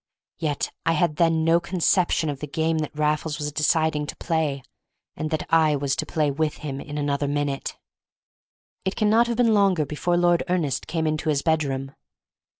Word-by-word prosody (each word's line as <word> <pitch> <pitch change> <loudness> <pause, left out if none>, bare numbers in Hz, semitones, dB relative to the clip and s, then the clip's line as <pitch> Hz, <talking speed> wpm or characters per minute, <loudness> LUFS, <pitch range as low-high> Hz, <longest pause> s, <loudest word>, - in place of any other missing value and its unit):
Yet 150 -4 -1
I 165 - +2
had 155 -1 +1
then 165 -1 +3
no 165 +1 +4
conception 175 -1 +1
of 140 - -7
the 150 - -5
game 160 +2 0
that 150 -1 -4
Raffles 150 0 0
was 150 -1 -3
deciding 155 0 +1
to - - -6
play, 155 -5 -1 0.5
and 155 - -3
that 155 -1 -2
I 155 -2 +5
was 140 -1 0
to 155 -2 -2
play 150 -2 0
with 150 +2 -1
him 140 -1 -4
in 145 0 -7
another 145 0 -1
minute. 145 -1 -2 1.1
It 190 - -2
cannot 220 +2 +3
have 235 -1 -2
been 235 -2 +4
longer 195 -7 +3
before 175 +5 -1
Lord 175 -1 +3
Ernest 155 -7 -1
came 160 0 -1
into 155 0 -1
his 140 -2 +1
bedroom. 140 -4 0
155 Hz, 180 wpm, -24 LUFS, 145-170 Hz, 1.1 s, I